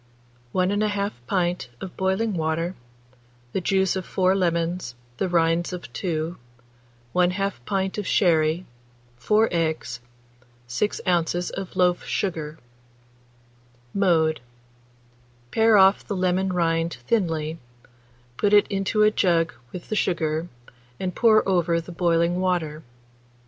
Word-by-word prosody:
1 185 0 +1
1/2 205 0 0 0.2
pint 175 -6 -1
of 185 - -8
boiling 190 +4 0
water, 165 +1 -1 0.8
the 190 - -1
juice 190 +1 +1
of 190 - -2
4 185 +1 +1
lemons, 170 -6 -1 0.2
the 190 - -1
rinds 170 +1 +1
of 180 - -8
2, 165 -1 -2 0.8
1/2 185 +2 +1
pint 195 +1 -1
of 205 - -4
sherry, 165 -1 +2 0.5
4 215 - +3
eggs, 160 -7 -1 0.7
6 125 +13 -2
oz. 175 -1 0
of 195 -1 -6
loaf 180 -1 +2
sugar. 160 -5 -3 1.4
Mode. 160 -6 +2 1.1
Pare 225 -1 +5
off 190 +1 +5
the 205 - -2
lemon 185 +1 +1
rind 165 -2 0
thinly, 165 - 0 0.8
put 205 0 +1
it 205 - +7
into 195 +2 +1
a 210 - +5
jug 170 -5 +2 0.2
with 180 - -9
the 215 - -1
sugar, 160 -4 0 0.5
and 185 -1 -2
pour 215 0 +4
over 175 -3 +2
the 170 +1 -9
boiling 170 0 +1
water. 165 -5 -1
180 Hz, 120 wpm, -24 LUFS, 165-195 Hz, 1.4 s, it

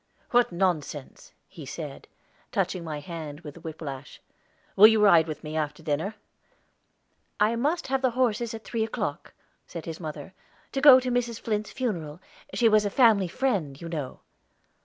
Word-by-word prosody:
"What 245 -3 +4
nonsense!" 165 -6 -2 0.2
he - - -11
said, - - -7 0.4
touching 180 - -1
my 155 -3 -5
hand 155 -2 -7
with 150 -3 -9
the 170 - -13
whiplash. 150 -4 -8 0.6
"Will 210 +2 +10
you 220 0 +4
ride 175 -6 +6
with 155 - -6
me 155 0 -6
after 150 0 -3
dinner?" 160 +7 -2 1.2
"I 215 +3 +3
must 295 +9 0
have 270 0 0
the 260 - +3
horses 235 -2 +1
at 220 - -9
three 230 -2 -2
o'clock," 225 - -4 0.3
said 170 -2 -8
his 165 -1 -6
mother, 155 0 -7 0.4
"to 270 - -2
go 265 -3 +9
to 255 0 -3
Mrs. 240 -2 -1
Flint's 215 -1 -2
funeral. 175 - -3 0.4
She 235 - +4
was 215 -1 +4
a 205 - 0
family 215 -5 +4
friend, 175 - -1
you 170 - -7
know." 150 -6 -5
185 Hz, 165 wpm, -26 LUFS, 155-230 Hz, 1.2 s, Will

